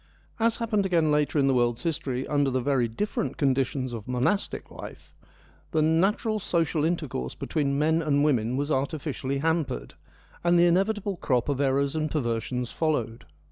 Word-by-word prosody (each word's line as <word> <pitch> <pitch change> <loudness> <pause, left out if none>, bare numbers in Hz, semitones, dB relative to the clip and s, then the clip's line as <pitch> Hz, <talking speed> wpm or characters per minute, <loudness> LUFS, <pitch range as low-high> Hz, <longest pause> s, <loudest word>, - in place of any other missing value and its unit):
As 230 0 +2
happened 220 -3 0
again 170 -5 +2
later 150 +1 +1
in 140 - +4
the 135 - +3
world's 120 -2 +1
history 140 -6 -2
under 145 -2 +2
the 130 0 0
very 130 -2 +1
different 135 - -3
conditions 135 -3 0
of 110 -3 -7
monastic 125 +11 -1
life, - - -10 0.6
the 155 -1 +3
natural 195 +7 +2
social 165 -5 0
intercourse 155 - -2
between 140 -3 -1
men 160 +2 +2
and 145 -2 +2
women 125 -4 +1
was 145 +2 -1
artificially 140 -1 -2
hampered, 160 - -1 0.5
and 175 0 +4
the 170 - +6
inevitable 195 +2 +1
crop 125 -5 0
of 140 -1 0
errors 140 +1 +1
and 155 -1 0
perversions 125 -3 -2
followed. 120 -8 -1
145 Hz, 160 wpm, -26 LUFS, 130-165 Hz, 0.6 s, the